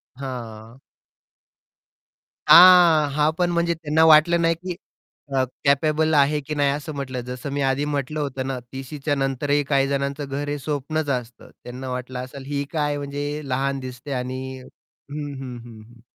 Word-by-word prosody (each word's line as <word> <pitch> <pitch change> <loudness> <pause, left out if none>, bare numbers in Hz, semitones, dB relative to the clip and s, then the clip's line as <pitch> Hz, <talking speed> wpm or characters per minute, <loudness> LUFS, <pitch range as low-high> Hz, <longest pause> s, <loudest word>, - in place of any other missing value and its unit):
हां. 120 -3 -8 1.7
हां. 175 -4 +8
हां, 150 +1 +2
पण 180 -1 +1
म्हणजे 170 0 +1
त्यांना 160 0 +1
वाटलं 160 +2 +6
नाही, 165 0 +2
की 180 +2 -6 0.6
अ, 130 - +3 0.2
कॅपेबल 155 +3 +2
आहे 150 +1 +3
की 150 +2 -5
नाही, 145 -1 +2
असं 145 +2 -5
म्हंटलं. 130 -3 -4
जसं 125 +3 -6
मी 145 - -2
आधी 135 +2 +1
म्हटलं 150 +1 -3
होतं 135 -2 -3
ना, 135 -1 -3
30शीच्या 135 +2 -3
नंतरही 140 +1 0
काही 135 -1 +2
जणांचं 140 +1 -2
घर 145 +1 -4
हे 145 - -1
स्वप्नच 150 +2 -3
असतं. 125 -2 -5
त्यांना 125 +2 -7
वाटलं 125 0 -5
असेल, 135 +1 -10
ही 140 0 -2
काय 150 -2 0
म्हणजे 145 +1 -4
लहान 135 +1 -1
दिसते 130 +2 -8
आणि 130 0 -3 0.2
हं, 145 +3 -10
हं, 125 -2 -7
हं, 115 -2 -12
हं. 120 0 -18
140 Hz, 160 wpm, -23 LUFS, 130-150 Hz, 1.7 s, हां